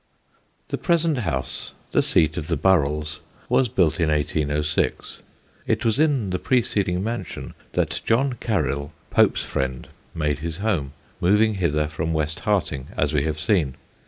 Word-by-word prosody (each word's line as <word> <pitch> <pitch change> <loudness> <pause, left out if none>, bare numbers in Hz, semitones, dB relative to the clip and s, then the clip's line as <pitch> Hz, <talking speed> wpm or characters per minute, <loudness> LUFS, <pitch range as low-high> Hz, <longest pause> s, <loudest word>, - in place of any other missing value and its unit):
The - - -2
present 165 -5 +2
house, 75 - -2 0.2
the - - +4
seat 80 -1 +3
of 80 -4 -4
the 85 - 0
Burrells, 75 -3 +2 0.3
was 130 -3 +3
built 85 -5 +2
in 80 -2 +2
1806. 75 0 0 0.5
It - - 0
was 115 +4 +2
in 140 -11 +2
the 90 - -1
preceding 100 -7 +1
mansion 115 -3 -5 0.2
that - - 0
John 130 +4 +2
Caryll, 75 - -1 0.2
Pope's - - +3
friend, 65 -1 -3 0.3
made 75 -2 0
his 80 +1 -4
home, 90 -10 -1 0.3
moving 105 +5 +4
hither 75 -6 +1
from 80 +1 -2
West 80 +2 -1
Harting, 75 -10 0
as 75 +1 +1
we 75 -1 +2
have 80 -1 -2
seen. 80 -6 +1
80 Hz, 150 wpm, -23 LUFS, 75-105 Hz, 0.5 s, the